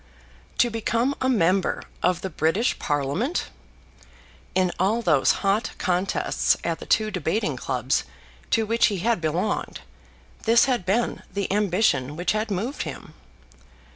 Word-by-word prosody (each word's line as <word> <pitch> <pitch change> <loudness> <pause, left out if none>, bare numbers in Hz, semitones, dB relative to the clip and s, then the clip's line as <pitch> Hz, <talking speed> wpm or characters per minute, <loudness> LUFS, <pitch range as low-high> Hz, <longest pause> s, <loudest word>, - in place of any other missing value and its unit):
To 240 - +3
become 230 +4 0
a 260 - +2
member 190 -5 +2 0.2
of 180 -1 +1
the 190 - -4
British 165 - +1
Parliament! 145 - -1 1.1
In 185 -1 +2
all 215 +6 +1
those 155 -8 +4
hot 200 +4 +1
contests 185 +1 +1
at 165 -1 -2
the - - -9
two 215 0 +2
debating 180 -3 -1
clubs 130 +1 -1 0.5
to 225 - +2
which 230 +2 +3
he 205 - -2
had 225 +1 0
belonged, 170 +6 -2 0.6
this 230 +1 +5
had 245 -9 -1
been 230 +5 0
the 200 -1 -2
ambition 180 - +1
which 175 +3 0
had 215 +1 -1
moved 215 +8 -3
him. - - -7
195 Hz, 140 wpm, -24 LUFS, 170-225 Hz, 1.1 s, this